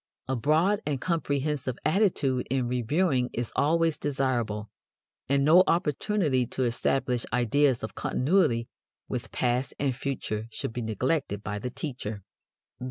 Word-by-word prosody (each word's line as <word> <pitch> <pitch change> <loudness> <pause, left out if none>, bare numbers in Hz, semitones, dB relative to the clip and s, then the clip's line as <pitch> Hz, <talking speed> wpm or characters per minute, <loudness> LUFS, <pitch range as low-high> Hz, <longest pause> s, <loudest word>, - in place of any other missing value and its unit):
A 130 - 0
broad 160 - +2
and 145 -3 -2
comprehensive 145 -6 -1
attitude 155 - +2
in 130 -1 0
reviewing 125 +2 +1
is 120 0 -3
always 165 +1 +2
desirable, 120 -7 -1 0.6
and 140 0 +3
no 170 +5 +7
opportunity 150 - +1
to 130 - -2
establish 125 0 0
ideas 125 +2 +2
of 110 - -4
continuity 125 -6 +1 0.4
with - - -4
past 125 +1 0
and 135 -3 0
future 120 -5 -3
should 115 - -4
be 120 - -3
neglected 110 - -1
by 105 -1 -3
the 125 - -4
teacher. 125 - -5
130 Hz, 130 wpm, -27 LUFS, 120-150 Hz, 0.6 s, no